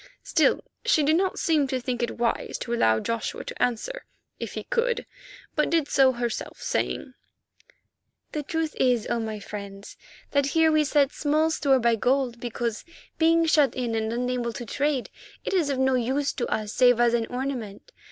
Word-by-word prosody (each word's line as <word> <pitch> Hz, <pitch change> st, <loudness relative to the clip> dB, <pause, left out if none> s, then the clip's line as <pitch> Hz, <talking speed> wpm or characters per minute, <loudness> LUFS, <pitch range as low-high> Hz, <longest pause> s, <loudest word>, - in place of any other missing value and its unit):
Still, -, -, +2 dB, 0.2 s
she 475 Hz, -11 st, +3 dB
did 305 Hz, +2 st, +3 dB
not 375 Hz, +2 st, +1 dB
seem 305 Hz, -4 st, +2 dB
to 260 Hz, -1 st, -1 dB
think 245 Hz, -1 st, -3 dB
it 240 Hz, -, -2 dB
wise 235 Hz, -1 st, -1 dB
to 235 Hz, -, -3 dB
allow 110 Hz, -, +3 dB
Joshua 230 Hz, -, -3 dB
to -, -, -7 dB
answer—if 250 Hz, -, -4 dB
he -, -, -5 dB
could—but 485 Hz, -8 st, -3 dB
did 325 Hz, -4 st, +2 dB
so 265 Hz, -2 st, +4 dB
herself, 240 Hz, -2 st, -4 dB
saying: 260 Hz, -, -2 dB, 1.2 s
"The 300 Hz, -, -2 dB
truth 320 Hz, +2 st, -2 dB
is, 245 Hz, -4 st, +2 dB
O 235 Hz, -, +1 dB
my 220 Hz, -1 st, -4 dB
friends, 200 Hz, -1 st, -8 dB, 0.3 s
that 280 Hz, -1 st, +2 dB
here 320 Hz, -1 st, +5 dB
we 310 Hz, -1 st, +3 dB
set 285 Hz, -1 st, +3 dB
small 310 Hz, +2 st, +1 dB
store 280 Hz, -4 st, +3 dB
by 235 Hz, -2 st, +2 dB
gold 250 Hz, 0 st, +1 dB
because, 235 Hz, -1 st, -3 dB, 0.4 s
being 330 Hz, +1 st, +4 dB
shut 300 Hz, -5 st, +3 dB
in 245 Hz, -3 st, -2 dB
and 220 Hz, 0 st, -1 dB
unable 245 Hz, 0 st, -1 dB
to 240 Hz, -, -6 dB
trade, 280 Hz, +2 st, -1 dB, 0.3 s
it -, -, -2 dB
is 340 Hz, -6 st, +2 dB
of 275 Hz, -, 0 dB
no 265 Hz, 0 st, +2 dB
use 260 Hz, +3 st, 0 dB
to 245 Hz, -, -2 dB
us 215 Hz, -1 st, -2 dB
save 245 Hz, -2 st, +5 dB
as 240 Hz, -1 st, +4 dB
an 230 Hz, -1 st, +1 dB
ornament. 250 Hz, -, -5 dB
260 Hz, 175 wpm, -26 LUFS, 235-300 Hz, 1.2 s, here